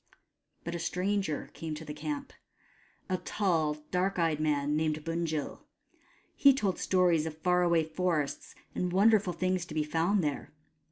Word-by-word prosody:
But 170 - -4
a 170 - -3
stranger 185 -1 -1
came 160 -2 -5
to 160 +1 -8
the 150 - -6
camp: 280 - -5 0.7
a 185 -2 0
tall 165 -7 0 0.2
dark 185 +2 0
eyed 165 -3 +1
man 150 -1 +1
named 155 0 -1
Bunjil. 165 -2 -3 0.7
He 280 -2 +6
told 200 -8 -1
stories 175 -4 +2
of 155 -1 -7
far 180 +2 +2
away 170 -2 +3
forests 160 -2 -2 0.2
and 180 -1 -1
wonderful 200 0 +4
things 185 +1 0
to 155 - -8
be 155 - +1
found 165 +6 +1
there. 145 -1 -3
170 Hz, 155 wpm, -30 LUFS, 155-185 Hz, 0.7 s, He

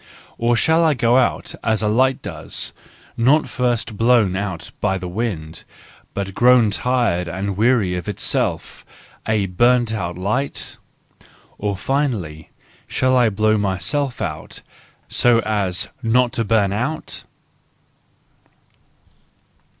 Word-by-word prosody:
Or 120 +1 +2
shall 160 +7 +3
I 155 -3 +3
go 120 0 +3
out 130 - 0
as 110 -1 +1
a - - +2
light 130 +5 +2
does, - - -3 0.4
not 135 +7 +3
first 120 -4 -1
blown 115 -5 +3
out 95 -5 -4
by 95 - +1
the 90 -1 -6
wind, 90 -5 -4 0.5
but 100 -1 -3
grown 120 -1 +5
tired 115 -7 0
and 95 +3 -3
weary 110 -3 +2
of 90 +2 -4
itself—a 105 -1 -3
burnt 120 +5 +2
out 90 -5 -3
light? 115 +10 -3 0.8
Or 100 -2 -2
finally, 105 - -2 0.4
shall 130 0 +1
I 120 -3 +4
blow 110 +1 +2
myself 125 +7 -1
out, - - -6 0.4
so 120 -1 +3
as 100 -5 -1
not 120 +1 +2
to 115 - 0
bum 100 -2 +2
out 125 +9 -3
110 Hz, 120 wpm, -20 LUFS, 95-125 Hz, 0.8 s, grown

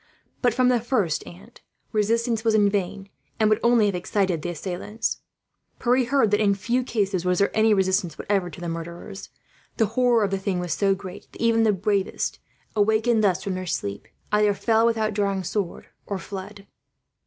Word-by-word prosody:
But 245 -3 +2
from 250 0 +4
the 245 -1 +3
first, 215 - 0
aunt, 200 +7 -14 0.3
resistance 225 +1 +1
was 225 -2 +3
in 205 -2 +4
vain, 195 0 -2 0.3
and 215 -1 +3
would 215 - +3
only 235 -2 +4
have 200 - +1
excited 180 -1 0
the 175 - -3
assailants. 185 +6 -4 0.6
Pierre 250 +1 +2
heard 260 -4 +2
that 210 - +3
in 200 -2 +3
few 240 +6 0
cases 200 -7 -1
was 180 0 +1
there 200 - +1
any 220 0 +4
resistance, 190 -4 +1
whatever, 195 -3 0
to 160 - -11
the 175 - -5
murderers. 170 +4 -7 0.5
The 225 - +4
horror 245 -2 +3
of 200 - 0
the 195 - -1
thing 190 -1 -1
was 175 -2 -2
so 195 -1 +2
great 190 0 -10
that - - -14
even 230 -1 +3
the 220 -1 +4
bravest, 200 0 -1 0.4
awakened 220 +2 +2
thus 185 -3 +2
from 195 - -2
their 185 0 -5
sleep, 100 - -3 0.2
either 210 -1 +3
fell 225 +2 +3
without 220 -2 0
drawing 200 -2 0
sword, 190 0 -3 0.2
or 200 - -2
fled." 195 +2 -8
205 Hz, 190 wpm, -24 LUFS, 190-225 Hz, 0.6 s, from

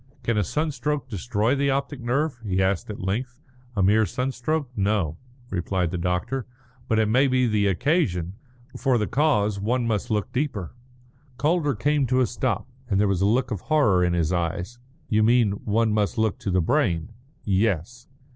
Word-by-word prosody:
"Can 115 - 0
a 105 - +2
sunstroke 150 - -2
destroy 115 +2 0
the 140 0 +1
optic 140 0 -2
nerve?" 130 +2 -1
he 95 -3 -1
asked 95 0 0
at 105 - -6
length. 125 +7 -3 0.4
"A 100 - +2
mere 105 +2 +4
sunstroke? 135 +4 -2
No," 95 -6 0 0.3
replied 90 -1 -1
the 90 - -3
doctor. 90 +9 -2 0.4
"But 110 - +1
it 110 - +3
may 130 +6 +4
be 130 -1 +2
the 105 -3 +2
occasion. 100 - +1 0.4
For 130 -3 +2
the 105 - 0
cause 110 -7 +1
one 120 +4 0
must 110 -4 -1
look 105 +2 -1
deeper." 125 - -2 0.6
Calder 150 0 +1
came 145 +4 +1
to 130 +1 +2
a 130 - +4
stop, 120 -3 -2 0.2
and 100 -2 +2
there 105 - +3
was 95 -2 0
a 100 - +4
look 125 +4 +1
of 105 -5 -3
horror 110 -13 +3
in 90 -1 +1
his 85 0 +1
eyes. 90 +7 -2 0.3
"You 110 0 +2
mean 115 -1 +4
one 110 +1 +2
must 105 0 0
look 110 -2 0
to - - -4
the 90 -1 +2
brain?" 90 - +1 0.4
"Yes." 100 +3 0
110 Hz, 180 wpm, -24 LUFS, 95-130 Hz, 0.6 s, mere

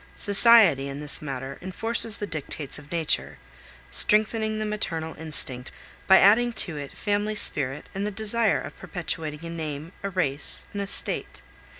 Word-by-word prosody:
Society, 200 - +5
in 140 +1 -6
this 150 0 0
matter, 135 -2 -6
enforces 225 +4 0
the 205 - -3
dictates 155 -4 -5
of 145 0 -16
nature, 165 -3 -1 0.5
strengthening 215 0 +2
the 215 - -2
maternal 165 -7 -3
instinct 135 -5 -2 0.4
by 190 - +8
adding 235 +5 +5
to 175 -7 +2
it 140 -2 -8
family 205 +1 -1
spirit 140 -8 -2
and 200 +2 -2
the - - -1
desire 220 +1 +1
of - - -8
perpetuating 160 -3 -4
a - - -5
name, 155 -1 -5
a 200 - -3
race, 150 -7 0
an 205 - -4
estate. 200 0 -2
175 Hz, 155 wpm, -25 LUFS, 150-210 Hz, 0.5 s, by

